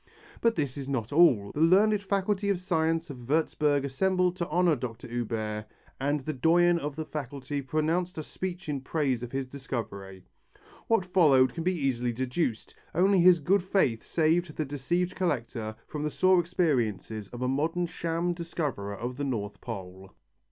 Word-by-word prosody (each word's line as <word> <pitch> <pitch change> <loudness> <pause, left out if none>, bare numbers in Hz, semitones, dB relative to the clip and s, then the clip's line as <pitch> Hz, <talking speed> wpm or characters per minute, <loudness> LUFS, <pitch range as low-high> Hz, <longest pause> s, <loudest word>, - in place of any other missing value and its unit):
But 230 -1 +3
this 145 -4 -2
is 140 -1 -5
not 125 -2 -2
all. 125 -12 +5
The 150 - -2
learned 200 +5 +5
Faculty 200 0 0
of 195 -3 +1
Science 165 -2 0
of 130 - -9
Würtzburg 145 +1 +1
assembled 180 +6 +1
to 170 -2 -3
honour 175 0 +3
Dr. 120 -3 -6
Huber 110 -3 -3 0.4
and 145 +2 0
the 155 +4 -3
doyen 170 +5 +4
of 145 -2 -4
the 160 0 -4
Faculty 140 -1 -5
pronounced 160 +6 -1
a 155 - -3
speech 185 +3 -6
in 140 -3 -2
praise 135 -3 -1
of 120 -1 -6
his 135 0 -2
discovery. 110 -8 -6 0.6
What 225 -5 +2
followed 150 -8 +4
can 165 - -4
be 185 +1 +1
easily 125 -4 0
deduced. 125 0 -2 0.2
Only 190 +3 +4
his 175 0 +7
good 190 +7 +2
faith 175 - +1
saved 165 0 +1
the 155 - 0
deceived 175 +6 -1
collector 115 -10 -2
from 150 - -6
the 150 - 0
sore 185 +3 +4
experiences 120 - -1
of 120 +3 -6
a - - +1
modern 160 +7 0
sham 170 +1 -2
discoverer 150 - -4
of 125 +2 -5
the 145 - -3
North 105 -7 -3
Pole. 95 -4 -8
150 Hz, 170 wpm, -28 LUFS, 125-175 Hz, 0.6 s, his